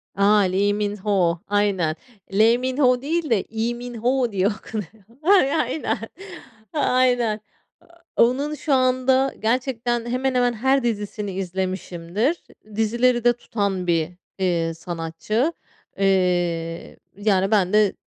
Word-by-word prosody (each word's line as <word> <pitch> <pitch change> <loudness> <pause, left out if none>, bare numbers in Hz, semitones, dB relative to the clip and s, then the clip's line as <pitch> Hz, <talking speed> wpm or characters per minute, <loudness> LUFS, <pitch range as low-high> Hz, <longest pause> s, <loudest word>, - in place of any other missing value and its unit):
A, 200 +2 +4
Lee 200 +2 +2
Min-ho, 200 -4 0
aynen 200 -6 +1 0.4
Le 225 +4 +5
Mmin-ho 255 0 +2
değil 315 +2 -1
de, 230 - +4 0.2
Lee 225 +2 -1
Min-ho 245 0 -1
diye 195 0 +1
okunuyor. 215 -1 -6 0.2
Ay 350 -6 +4
aynen, 280 0 -1 0.8
aynen. 250 -6 +2 0.8
A - - +7
onun 280 +5 -1
şu 295 -1 -1
anda, 260 +1 +2
gerçekten 240 0 -1
hemen, 255 +2 -1
hemen 245 -1 +2
her 265 +4 +1
dizisini 210 -3 -3
izlemişimdir. 185 - -2 0.3
Dizileri 240 +2 +2
de 240 - +5
tutan 200 -6 -3
bir, 165 -1 +1 0.3
eee, 170 -3 0
sanatçı. 170 - -2 0.4
Eee, 175 -4 0 0.2
yani 200 -1 +1
ben 195 -2 +2
de 210 -2 +4
220 Hz, 115 wpm, -22 LUFS, 190-250 Hz, 0.8 s, A